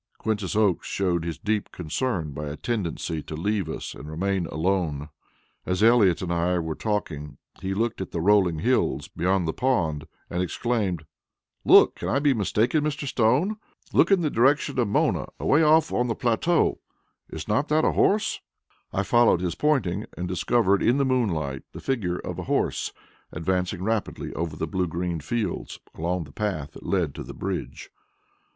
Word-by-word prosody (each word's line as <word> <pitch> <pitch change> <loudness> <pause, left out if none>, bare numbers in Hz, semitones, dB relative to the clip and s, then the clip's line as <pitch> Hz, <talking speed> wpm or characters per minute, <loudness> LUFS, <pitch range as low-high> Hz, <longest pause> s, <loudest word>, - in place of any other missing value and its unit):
Quintus 105 -5 -2
Oakes 105 -4 +2
showed 90 -4 0
his 85 -1 -4
deep 105 -1 -2
concern 85 - -2
by 75 +2 -5
a 75 +1 -5
tendency 85 -8 -2
to 75 - -7
leave 100 +1 -1
us - - -5
and 75 - -9
remain 95 +2 -1
alone. 80 -4 -1 0.5
As 90 +3 0
Elliott 110 -7 +5
and 85 -1 -1
I 85 +1 +1
were 80 -2 -2
talking, 75 -9 -3 0.2
he 95 0 -2
looked 115 -1 -1
at 95 - -4
the 85 - -3
rolling 95 -2 +3
hills 70 -2 +1
beyond 90 0 0
the 80 - -1
pond 80 - 0 0.2
and 90 - -2
exclaimed: 95 -4 -1 0.6
"Look! - - +6
Can - - -3
I - - +2
be 145 0 +3
mistaken, 115 - +1
Mr. 150 -1 -2
Stone? 135 - +2 0.4
Look - - +5
in 195 -3 +4
the 155 -3 0
direction 135 +3 +2
of 120 - +2
Mona 100 - +1
away 150 - +3
off 155 +1 +4
on 125 - +1
the 115 - -1
plateau 130 +9 +1 0.5
is 80 - -7
not 110 +7 +1
that 155 +1 +2
a - - +3
horse?" 210 +1 +2 0.5
I 100 - 0
followed 120 -5 +4
his 90 -2 -1
pointing 115 - 0
and 90 - -3
discovered 100 +2 +2
in 120 +3 +3
the 140 - +2
moonlight 85 - 0
the - - -7
figure 100 -10 -1
of - - -6
a - - -3
horse - - 0 0.4
advancing 90 +2 -1
rapidly 110 0 -2
over 80 -2 -3
the 80 - -2
blue 90 0 -1
green 85 0 -2
fields, 105 +4 -3
along 85 +2 -2
the 70 - -13
path 85 -7 -3
that - - -11
led 90 -8 0
to - - -6
the - - -9
bridge. - - -5
95 Hz, 175 wpm, -25 LUFS, 85-120 Hz, 0.6 s, Look